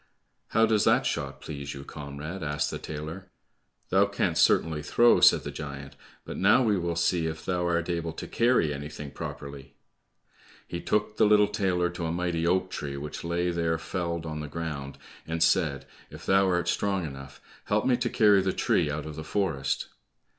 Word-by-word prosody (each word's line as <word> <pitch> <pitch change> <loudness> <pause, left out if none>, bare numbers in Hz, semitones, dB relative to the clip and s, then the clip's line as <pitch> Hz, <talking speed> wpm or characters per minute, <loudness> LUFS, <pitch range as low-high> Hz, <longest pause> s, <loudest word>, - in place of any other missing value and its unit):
"How 115 +1 +3
does 110 -2 +2
that - - +4
shot - - -3
please 70 -2 -6
you, 70 - -8
comrade?" 75 +6 -7
asked 75 -1 -1
the - - -5
tailor. 80 +5 -7 0.6
"Thou - - +4
canst - - 0
certainly 80 -2 +3
throw," 120 +10 +4
said - - +6
the - - -5
giant, 70 -2 -7 0.3
"but - - -6
now 105 +7 +5
we 110 -3 +3
will 85 -2 -1
see 85 0 +1
if 80 0 -6
thou 90 -1 0
art 85 -1 0
able 85 -1 -2
to - - -7
carry 115 -11 +2
anything 75 0 -7
properly." 70 0 -8 0.9
He 85 - -5
took 105 0 0
the - - +5
little 105 -1 +5
tailor 90 -4 0
to 85 -1 -4
a - - -2
mighty 85 -1 -1
oak 95 +1 +1
tree 70 -4 -4
which 75 +2 -6
lay 85 +1 0
there 85 -1 0
felled 85 -1 -3
on 75 -1 -4
the 75 - -5
ground, 70 -3 -5 0.3
and 80 0 0
said, 80 -4 +2 0.2
"If - - -11
thou 95 0 +4
art 90 -2 +1
strong 95 0 0
enough, 70 -2 -9 0.3
help 105 +1 +1
me 130 - +4
to 125 0 -1
carry 105 -5 +5
the 95 0 0
tree - - +1
out 75 +1 -3
of 75 -1 -7
the 80 - -6
forest." 80 -4 -1
85 Hz, 190 wpm, -27 LUFS, 75-95 Hz, 0.9 s, said